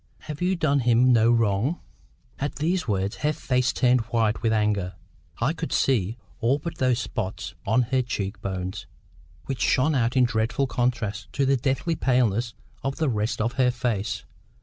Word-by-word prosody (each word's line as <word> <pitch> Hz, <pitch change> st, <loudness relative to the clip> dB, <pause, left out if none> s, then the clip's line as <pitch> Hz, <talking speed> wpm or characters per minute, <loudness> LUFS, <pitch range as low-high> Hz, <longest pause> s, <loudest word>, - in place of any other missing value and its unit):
Have 150 Hz, -1 st, -7 dB
you 185 Hz, +1 st, +2 dB
done 150 Hz, -5 st, +2 dB
him 125 Hz, +1 st, +4 dB
no 115 Hz, 0 st, +5 dB
wrong?" 115 Hz, -, +2 dB, 0.6 s
At 145 Hz, +1 st, -2 dB
these 170 Hz, +3 st, 0 dB
words, 100 Hz, -1 st, -1 dB
her 150 Hz, -, +1 dB
face 125 Hz, -3 st, +1 dB
turned 125 Hz, -1 st, +3 dB
white—with 110 Hz, -1 st, +1 dB
anger, 105 Hz, -4 st, 0 dB, 0.4 s
I 125 Hz, +7 st, +1 dB
could 165 Hz, -1 st, -5 dB
see—all 115 Hz, +2 st, 0 dB
but 170 Hz, +3 st, -7 dB
those 130 Hz, -2 st, +2 dB
spots 110 Hz, -5 st, -4 dB
on 125 Hz, -, +3 dB
her 130 Hz, +2 st, +1 dB
cheek 105 Hz, -5 st, -4 dB
bones, 95 Hz, -1 st, -4 dB, 0.6 s
which 135 Hz, -3 st, -4 dB
shone 150 Hz, +5 st, +3 dB
out 125 Hz, -1 st, +1 dB
in 130 Hz, -, +6 dB
dreadful 115 Hz, +3 st, +1 dB
contrast 120 Hz, -5 st, -2 dB
to 140 Hz, -, +1 dB
the 135 Hz, +1 st, +3 dB
deathly 135 Hz, +6 st, 0 dB
paleness 120 Hz, -4 st, +1 dB, 0.3 s
of 135 Hz, 0 st, -2 dB
the 155 Hz, -3 st, 0 dB
rest 110 Hz, -1 st, -1 dB
of 115 Hz, +3 st, 0 dB
her 125 Hz, -, +4 dB
face. 115 Hz, -4 st, -2 dB
120 Hz, 165 wpm, -25 LUFS, 110-135 Hz, 0.6 s, in